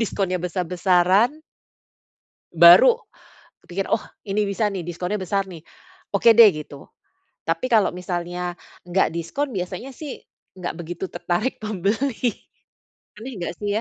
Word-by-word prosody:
diskonnya 195 -4 -1
besar-besaran 180 - +2 1.1
baru, 170 - +8 0.7
pikir, 190 +2 -4
"Oh 220 - +1 0.3
ini 210 +2 +1
bisa 205 +2 0
nih 190 -4 -5
diskonnya 180 +4 -3
besar 195 0 -2
nih, 170 -3 -11 0.5
oke 200 +4 +3
deh." 230 -2 +10
gitu, 150 -3 -9 0.6
tapi 165 +10 -1
kalau 215 -6 +3
misalnya 175 0 -4 0.2
nggak 175 -1 0
diskon 245 - -3
biasanya 185 +8 -5
sih, 290 +1 -7 0.4
nggak 175 -2 -4
begitu 175 +2 -5
tertarik 180 +8 -3
membeli, 215 +4 -1 0.8
aneh 250 +5 -8
nggak 170 - -3
sih 205 - -4
190 Hz, 120 wpm, -22 LUFS, 175-215 Hz, 1.1 s, deh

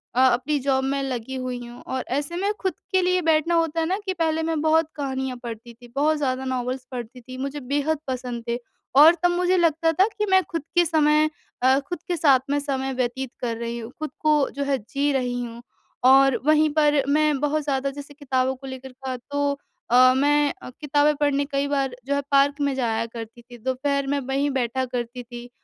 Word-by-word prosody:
अ, - - +2
अपनी 260 +4 +2
जॉब 265 0 +1
में 275 +1 -1
लगी 260 -1 -4
हुई 250 -1 -4
हूँ। 240 +1 -11
और 260 -1 -2
ऐसे 290 +4 -3
में 395 +4 0
खुद 375 -3 -1 0.2
के 375 -1 +3
लिए 365 0 +2
बैठना 325 +1 +2
होता 330 -1 +1
हैं 320 - 0
ना, 375 +3 0
कि 380 - -1
पहले 320 -2 0
मैं 320 -1 -1
बहुत 320 0 +3
कहानियाँ 265 -3 -3
पढ़ती 235 0 -7
थी, 240 +1 -16
बहुत 305 +2 +2
ज़्यादा 265 -2 -1
नॉवेल्स 255 0 -3
पढ़ती 245 0 -7
थी, 255 +2 -10
मुझे 275 +2 -4
बेहद 290 +4 -1
पसंद 250 -2 -4
थे। 235 0 0 0.4
और 315 +4 +9
तब 355 - +4
मुझे 360 +1 +2
लगता 330 -1 +2
था 370 +5 +3
कि 425 - +1
मैं 380 0 +6
खुद 330 -1 -2
के 350 0 +5
समय 305 -1 +3 0.3
अ, 260 +2 +4
खुद 305 +4 -6
के 355 - 0
साथ 280 -4 +5
में 290 +1 +1
समय 270 -2 -2
व्यतीत 255 +1 -2
कर 235 -2 -1
रही 235 0 -4
हूँ, 230 +1 -8
खुद 310 - -3
को 300 -2 +3
जो 280 - -1
हैं 280 -1 +1
जी 285 +1 +1
रही 250 -2 -1
हूँ, 235 0 -8 0.4
और 270 0 +6
वहीं 310 0 +4
पर 295 -2 +3
मैं 300 -1 +2
बहुत 295 +1 0
ज़्यादा 275 -1 -1
जैसे 285 +1 -10
किताबों 265 -2 -1
को 270 +1 -11
लेकर 260 0 -8
था, 260 0 -6
तो 285 +3 -1 0.4
अ, 255 +1 +7
मैं 290 +1 +3
अ, - - -8
किताबें 295 0 +2
पढ़ने 285 -1 +1
कई 280 0 0
बार 275 -3 -1
जो 280 +1 0
है 280 - 0
पार्क 280 +1 +3
में 280 -1 +1
जाया 230 -3 0
करती 230 0 -9
थी। 240 +1 -14
दोपहर 270 +3 -1
में 285 +1 0
वहीं 275 +2 -1
बैठा 260 0 -1
करती 245 0 -5
थी 240 0 -10
275 Hz, 215 wpm, -24 LUFS, 255-300 Hz, 0.4 s, और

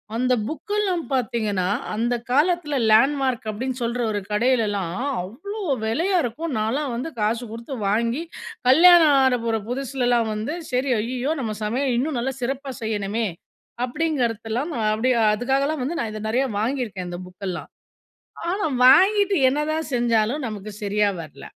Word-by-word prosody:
அந்த 255 +2 +2
புக்கெல்லாம் 370 - -1
பார்த்தீங்கன்னா 215 -7 0 0.3
அந்த 240 +2 0 0.2
காலத்தில 305 +1 +2 0.2
லேண்ட்மார்க் 260 0 +3
அப்டின்னு 255 +4 -3
சொல்ற 240 +1 -1
ஒரு 205 - -1
கடையிலலாம் 210 -6 +1 0.3
அவ்வளோ 370 - -7 0.2
வேலயா 345 - +1
இருக்கும். 285 +6 -3
நான்லாம் 250 +4 -1
வந்து 260 +7 -3
காசு 225 +3 0
குடுத்து 235 +4 -6
வாங்கி 230 +7 0 0.5
கல்யாணம் 325 0 +7
ஆக 250 -2 +3
போற 225 -1 +1
புதுசுலலாம் 245 -3 0
வந்து, 215 +8 -3 0.2
சரி 255 +2 0
"ஐயயோ! 255 +6 -1
நம்ம 220 -3 -3
சமையல 250 +3 0
இன்னும் 275 +1 -1
நல்லா 265 +3 -2
சிறப்பா 270 +2 -3
செய்யணுமே!" 220 0 -1 0.6
அப்டிங்கிறதலாம் 250 -2 -1 0.2
அப்டி 235 +4 0 0.2
அதுக்காலாம் 270 +6 0
வந்து 320 +7 -2
நான் 225 - -2
இத 215 - -6
நிறையா 255 +4 +2
வாங்கியிருக்கேன் 220 -6 -2
இந்த 175 - -6
புக்கெல்லாம். 185 -1 -6 0.8
ஆனா, 395 +3 -1 0.2
வாங்கிட்டு 395 +7 +5
என்னதான் 305 +2 -2
செஞ்சாலும் 240 +3 +1
நமக்கு 210 0 -7
சரியா 205 +1 +2
வர்ல. 145 -3 -12
245 Hz, 135 wpm, -23 LUFS, 220-290 Hz, 0.8 s, கல்யாணம்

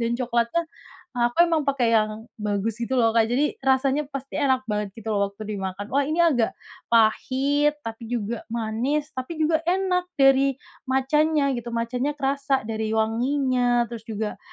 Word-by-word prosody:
dan 235 0 0
coklat 235 -2 +1
tuh 340 0 +2 0.5
aku 240 +7 +3
memang 320 -2 +2
pakai 260 -4 +2
yang 215 +1 0
bagus 210 +2 -2
gitu 240 +2 -2
loh, 230 -3 +4
Kak, 225 -1 +4
jadi 265 +6 0
rasanya 270 +2 +2
pasti 275 -1 -6
enak 265 -3 +2
banget 210 -2 -2
gitu 225 0 -5
loh 200 0 +2
waktu 200 +2 -11
dimakan. 195 +1 -4
Wah 280 +1 +1
ini 320 +3 +2
agak 250 -9 +2 0.3
pahit, 265 +6 +2
tapi 225 0 -6
juga 225 0 -3
manis, 235 +6 -1
tapi 260 +6 -5
juga 315 0 +3
enak 365 0 +1
dari 270 0 +4 0.3
matcha-nya 280 +2 +2
gitu, 235 0 -6
matcha-nya 245 +5 -1
kerasa 275 -1 0
dari 220 0 -2
wanginya, 245 +1 +1
terus 225 -2 -8
juga 215 -1 -4
250 Hz, 160 wpm, -24 LUFS, 225-280 Hz, 0.5 s, loh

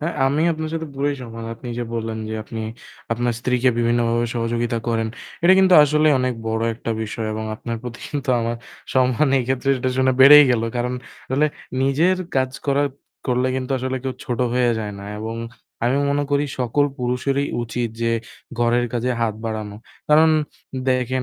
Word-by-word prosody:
হ্যাঁ, 165 +3 -2
আমি 145 +4 +1
আপনার 155 0 -4
সাথে 160 -1 -3
পুরোই 145 +1 0
সহমত। 115 -2 -7
আপনি 120 +2 -9
যে 120 - -2
বললেন 115 -1 -3
যে 110 - -3
আপনি 110 +1 -7 0.5
আপনার 120 +1 0
স্ত্রীকে 125 0 +2
বিভিন্নভাবে 120 0 +2
সহযোগিতা 115 0 -1
করেন। 115 -1 0 0.3
এটা 175 +2 +7
কিন্তু 190 -1 +6
আসলেই 150 +1 +4
অনেক 130 -1 0
বড় 110 0 -1
একটা 115 0 -5
বিষয় 110 +1 -4
এবং 110 0 -4
আপনার 115 +1 -5
প্রতি 120 -1 -7
কিন্তু 145 -1 -4
আমার 115 +1 -2 0.4
সম্মান 130 +2 +3
এক্ষেত্রে 130 +2 -1
এটা 130 +1 -1
শুনে 130 0 +4
বেড়েই 150 +2 +10
গেল। 115 -2 +2
কারণ 125 +1 -1 0.3
তাহলে 140 +4 +2 0.4
নিজের 160 +8 +3 0.2
কাজ 130 0 +2 0.2
করা 140 0 +2 0.4
করলে 125 0 +1
কিন্তু 130 0 -4
আসলে 130 +1 -2
কেউ 135 -1 -2
ছোট 125 -4 -3 0.2
হয়ে 125 -1 +3
যায় 105 -2 -4
না। 100 - -8 0.2
এবং 110 +1 -4 0.5
আমি 125 +3 +2
মনে 145 +1 +1
করি 145 0 +2
সকল 130 +3 +2
পুরুষেরই 130 +3 0 0.2
উচিত 120 0 -2
যে 115 0 +2 0.5
ঘরের 120 +1 +2
কাজে 125 +1 0
হাত 115 -2 +1
বাড়ানো। 110 -2 -4 0.3
কারণ 155 +1 +6 0.6
দেখেন 130 0 +1
125 Hz, 170 wpm, -21 LUFS, 115-140 Hz, 0.6 s, বেড়েই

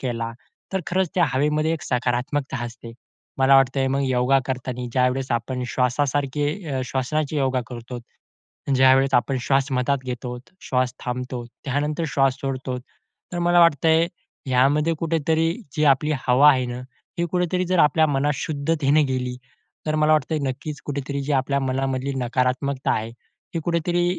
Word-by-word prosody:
केला, 115 -2 -3 0.4
तर 190 - 0
खरंच 185 0 +1
त्या 175 - +4
हवेमध्ये 150 +3 +1
एक 165 - -4
सकारात्मकता 125 +2 -1
असते. 115 0 -9 0.5
मला 135 +1 +5
वाटतं 135 0 +3
मग 140 +1 +1
योगा 130 +1 +3
करताना 125 -1 -4
ज्यावेळेस 130 +1 +1
आपण 120 +2 -2
श्वासासारखे 140 +3 0 0.2
अ, 130 - -1
श्वसनाचे 145 +4 -1
योगा 130 -2 +1
करतो, 120 0 -7 0.8
ज्यावेळेस 130 +1 +5
आपण 125 +3 +2
श्वास 135 +2 +1
मधात 130 +2 +1
घेतो, 125 0 -5 0.2
श्वास 125 -1 0
थांबतो, 125 0 -4 0.2
त्यानंतर 150 +4 -1
श्वास 135 -2 +2
सोडतो. 130 -2 -3 0.5
तर 175 - -3
मला 175 0 +4
वाटतंय, 165 0 +4 0.4
ह्यामध्ये 140 +5 +3
कुठेतरी 165 0 +1 0.2
जी 155 - +2
आपली 140 +3 +2 0.2
हवा 135 +4 +7
आहे 130 -3 +1
ना, 120 0 -5 0.4
हे 170 - +1
कुठेतरी 180 0 0
जर 185 0 +1
आपल्या 155 +2 +4
मनात 145 0 +1
शुद्धतेने 150 0 +1
गेली. 125 -2 -2 0.5
तर 155 - 0
मला 155 0 +3
वाटतंय 155 +1 +1
नक्कीच, 145 +3 -5
कुठेतरी 140 0 -3
जी 145 +2 -2
आपल्या 140 +1 +1
मनामधली 135 0 -1
नकारात्मकता 130 +2 0
आहे 110 +1 -2 0.4
हे 165 - -1
कुठेतरी 175 +1 0
135 Hz, 145 wpm, -23 LUFS, 125-150 Hz, 0.8 s, हवा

